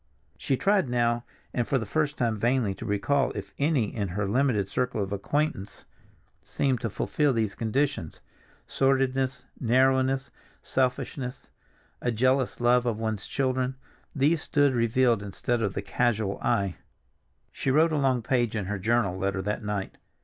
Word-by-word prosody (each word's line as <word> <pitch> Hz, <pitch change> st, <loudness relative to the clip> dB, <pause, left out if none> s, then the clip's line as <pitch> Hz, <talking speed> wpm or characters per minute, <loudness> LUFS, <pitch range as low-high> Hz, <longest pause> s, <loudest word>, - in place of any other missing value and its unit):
She 135 Hz, -, -1 dB
tried 195 Hz, -6 st, +2 dB
now 120 Hz, -1 st, +1 dB, 0.3 s
and 120 Hz, -2 st, 0 dB
for 135 Hz, -, +2 dB
the 115 Hz, -, -2 dB
first 150 Hz, +6 st, -1 dB
time 115 Hz, -4 st, 0 dB
vainly 120 Hz, -3 st, +1 dB
to 95 Hz, -, -8 dB
recall 135 Hz, +7 st, +1 dB
if -, -, -6 dB
any 140 Hz, -7 st, +1 dB
in 105 Hz, -3 st, -1 dB
her 100 Hz, +3 st, -2 dB
limited 115 Hz, -3 st, +1 dB
circle 125 Hz, 0 st, -1 dB
of 95 Hz, -, -6 dB
acquaintance 105 Hz, -1 st, -2 dB, 0.6 s
seemed 130 Hz, -4 st, -1 dB
to 115 Hz, -, -1 dB
fulfill 145 Hz, +7 st, 0 dB
these 110 Hz, -4 st, 0 dB
conditions. 115 Hz, -, -1 dB, 0.5 s
Sordidness, 135 Hz, 0 st, +1 dB
narrowness, 130 Hz, +2 st, +2 dB, 0.3 s
selfishness, 130 Hz, 0 st, -2 dB, 0.5 s
a 120 Hz, -, 0 dB
jealous 130 Hz, +3 st, +1 dB
love 120 Hz, 0 st, +3 dB
of 115 Hz, -3 st, 0 dB
one's 110 Hz, -2 st, -3 dB
children, 130 Hz, -1 st, 0 dB, 0.4 s
these 150 Hz, +3 st, +2 dB
stood 145 Hz, -4 st, +2 dB
revealed 120 Hz, -1 st, +2 dB
instead 105 Hz, +5 st, -2 dB
to 110 Hz, -3 st, 0 dB
the 95 Hz, +1 st, -5 dB
casual 110 Hz, -4 st, 0 dB
eye. 100 Hz, -3 st, 0 dB, 0.7 s
She -, -, -3 dB
wrote 155 Hz, +5 st, +4 dB
a 155 Hz, -, +1 dB
long 130 Hz, -4 st, +1 dB
page 120 Hz, -2 st, +1 dB
in 105 Hz, -4 st, -2 dB
her 100 Hz, +1 st, -3 dB
journal 105 Hz, -2 st, +1 dB
letter 95 Hz, 0 st, -1 dB
that 105 Hz, +3 st, -2 dB
night. 105 Hz, -2 st, -4 dB
120 Hz, 155 wpm, -27 LUFS, 105-135 Hz, 0.7 s, wrote